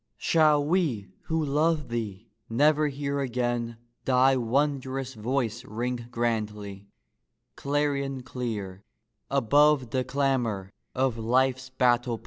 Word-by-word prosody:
Shall 155 -3 +3
we 150 - 0 0.2
who 160 -1 0
love 150 0 +1
thee 110 -6 -5 0.2
never 150 +5 +3
hear 140 0 -2
again 120 -3 -1 0.3
Thy 130 +1 +4
wondrous 130 +1 -1
voice 120 0 -2
ring 120 0 -4
grandly, 105 -4 -3 0.7
clarion 140 -2 -1
clear, 105 -7 -5 0.5
Above 145 0 +3
the 130 0 0
clamor 125 -8 -1 0.2
of 130 -3 0
life's 130 +3 +1
battle 125 -2 +2
plain - - -17
130 Hz, 110 wpm, -27 LUFS, 115-140 Hz, 0.7 s, Thy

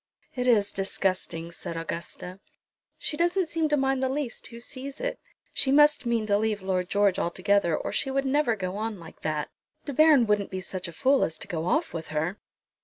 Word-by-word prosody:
"It 250 -1 -2
is 205 -4 +4
disgusting," 185 -3 -1
said 165 0 -6
Augusta. 170 +3 -5 0.6
"She - - -3
doesn't 350 +2 +2
seem 325 -1 -1
to 295 - +3
mind 270 -1 +1
the 260 - +1
least 270 -3 -3
who 235 -1 -10
sees 270 +3 -6
it. - - -3 0.3
She 265 - +2
must 295 -2 +5
mean 230 -2 +1
to 205 -1 +2
leave 215 -2 -1
Lord 185 -1 -1
George 200 -2 +3
altogether, 185 -1 +2
or - - -3
she 270 - -1
would 275 +1 0
never 265 -3 +2
go 185 -1 -4
on 215 -2 -3
like 165 -1 -13
that. 155 -1 -2 0.3
De 285 - -4
Baron 305 -3 +6
wouldn't 210 -2 +1
be 190 - -4
such 185 0 -5
a - - -7
fool 270 +8 +3
as 160 - -2
to - - -8
go 165 -4 -3
off 320 - +1
with 165 -1 -5
her?" 160 +6 -2
215 Hz, 205 wpm, -27 LUFS, 185-275 Hz, 0.6 s, Baron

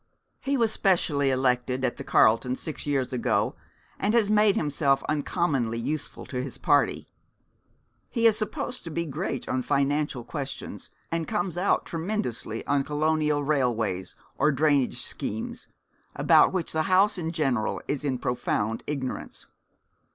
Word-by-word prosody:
He 275 0 0
was 230 -3 +2
specially 160 -9 +2
elected 130 0 +1
at 120 - -1
the - - -6
Carlton 120 +3 +3
six 155 +2 -4
years 135 -3 0
ago, 125 - +1 0.4
and 210 +3 +1
has 215 -3 +3
made 210 -1 +4
himself 145 -6 +1
uncommonly 145 -6 0
useful 145 +6 -4
to 125 -2 -3
his 130 -1 -6
party. 145 - +2 1.0
He 230 -2 0
is 225 -2 +6
supposed 230 +3 -4
to - - -5
be 170 +1 -2
great 135 -3 -4
on 130 - 0
financial 140 -1 0
questions, 140 +1 -6 0.2
and 165 -1 -1
comes 175 -1 -1
out 180 +3 +1
tremendously 165 - -3
on 140 -1 +2
colonial 150 0 +1
railways 115 -10 0 0.2
or 150 +3 +4
drainage 140 -2 +1
schemes, 110 +2 -5 0.5
about - - +5
which 185 -3 -2
the 160 +2 0
House 190 +1 +4
in 165 -2 -2
general 135 -9 0
is 145 -1 -2
in 135 -3 0
profound 115 -3 -1
ignorance. 135 -3 -4
145 Hz, 145 wpm, -26 LUFS, 130-170 Hz, 1.0 s, is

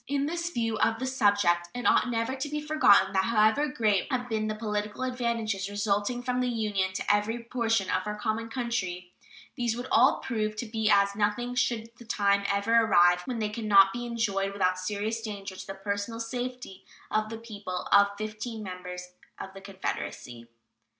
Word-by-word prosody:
In 280 0 0
this 340 +2 -2
view 230 -8 -2
of 225 0 +2
the 260 - -3
subject, 205 -9 +2
it 245 - -4
ought - - +4
never 230 +2 -1
to 270 +2 -4
be 300 +1 -2
forgotten 295 -11 +4
that 190 0 +2
however 230 +6 +3
great 215 -8 +1
may 255 - +1
have 245 0 -8
been 215 -1 -1
the 215 - -2
political 210 +1 -3
advantages 230 -6 -2
resulting 205 +4 -1
from 250 0 -1
the 250 - 0
Union 210 -5 -1
to - - -3
every 225 +3 -2
portion 225 -4 0
of - - -1
our 210 0 -3
common 225 +1 -2
country, 190 -8 -3 0.4
these 235 -2 -1
would 245 - -5
all 255 +5 +5
prove 215 -3 -2
to 225 - -4
be 220 -1 -1
as 200 -1 +4
nothing 215 +4 0
should 230 -2 -1
the 240 - -13
time 200 -3 +2
ever 200 +3 +2
arrive 180 -4 +5
when 250 -2 -3
they 215 -2 -1
can 215 +1 -5
not 195 -2 +7
be 240 +1 -4
enjoyed 200 -4 -1
without 185 -2 +1
serious 210 +4 -2
danger 200 -3 -6
to - - -9
the 195 - -6
personal 205 +3 -3
safety 245 -3 -5 0.3
of 215 0 0
the 225 - -5
people 205 -5 -6
of 200 0 +7
fifteen 215 +1 -5
members 180 -1 -7 0.3
of 190 - -8
the 195 - -11
Confederacy. 125 -11 -6
215 Hz, 190 wpm, -28 LUFS, 200-235 Hz, 0.4 s, not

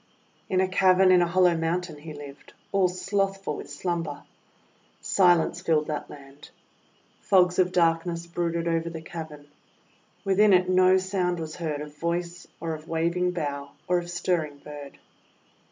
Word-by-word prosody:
In 185 0 +2
a 190 - +2
cavern 185 0 +4
in 180 -1 +6
a 175 - +2
hollow 180 0 +3
mountain 165 -1 -2
he 155 +2 -9
lived, 145 -2 -11 0.2
all 195 -2 +3
slothful 195 -2 -2
with - - -8
slumber. 165 0 -3 0.8
Silence 175 -2 +3
filled 160 -4 +1
that 150 -1 -4
land. 140 0 -13 0.7
Fogs 180 -2 +3
of 180 -1 +3
darkness 170 0 +1
brooded 170 0 -2
over 165 0 0
the 160 -1 -8
cav 165 -1 -7
ern. 145 -1 -13 0.8
Within 200 +1 +4
it 180 0 +4
no 185 0 +5
sound 185 -2 -1
was 155 -1 -6
heard 155 -4 -3
of 150 0 -9
voice, 170 +2 -3
or 165 -1 -3
of 155 0 -9
waving 170 +2 0
bough, 145 -5 -4
or 180 0 +2
of 175 0 -8
stirring 170 -4 -1
bird. 145 -1 -10
170 Hz, 155 wpm, -26 LUFS, 155-180 Hz, 0.8 s, in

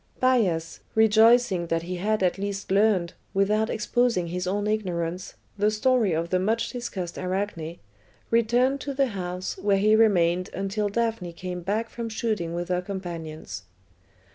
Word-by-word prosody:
Bias, 200 -11 +1 0.2
rejoicing 220 -4 +5
that 165 0 -1
he 180 +1 -4
had 210 +2 0
at 180 +1 +1
last 200 -1 -4
learned, 195 -4 +3 0.2
without 210 +3 +2
exposing 220 -5 +1
his 180 +1 -3
own 205 +2 -1
ignorance, 180 -4 -2 0.2
the 210 +1 +4
story 220 -1 +2
of 165 +1 -1
the 185 - +3
much 220 +5 0
discussed 195 -8 -5
Arachne, 185 -3 -3 0.5
returned 245 +4 +2
to 280 0 -4
the 270 -1 +2
house, 180 -2 -4
where 200 -1 +2
he 215 +2 +4
remained 180 -5 +3
until 195 +2 -1
Daphne 225 -5 -1
came 180 +1 -5
back 210 +6 -1
from 230 0 -5
shooting 215 -7 -2
with 175 +1 -4
her 180 0 +1
companions. 165 - -6
195 Hz, 150 wpm, -26 LUFS, 175-220 Hz, 0.5 s, rejoicing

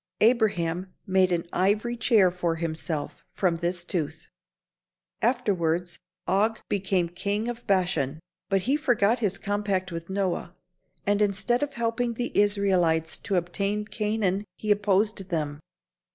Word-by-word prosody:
Abraham 190 -6 +2
made 190 -1 +3
an 170 0 0
ivory 210 +6 +1
chair 215 -6 +4
for 175 -2 -1
himself 160 -1 -3
from 180 -4 0
this 175 +1 -1
tooth. 160 -2 -3 0.9
Afterwards 180 -8 0 0.3
Og 215 +4 +2
became 190 -3 +1
King 200 +5 -2
of 240 0 -6
Bashan, 175 -7 +1 0.3
but 195 -1 +2
he 270 +9 +1
forgot 240 -6 +2
his 200 -4 0
compact 200 -2 -1
with 165 +1 -6
Noah 190 -2 -2 0.5
and 205 +1 +2
instead 210 +5 +2
of 290 -1 -2
helping 235 0 -1
the 245 +1 -3
Israelites 185 -6 +2
to 200 - -2
obtain 200 +4 -1
Canaan 210 -3 -1
he 215 - -1
opposed 205 -1 +1
them. 150 -4 -2
195 Hz, 130 wpm, -26 LUFS, 175-215 Hz, 0.9 s, chair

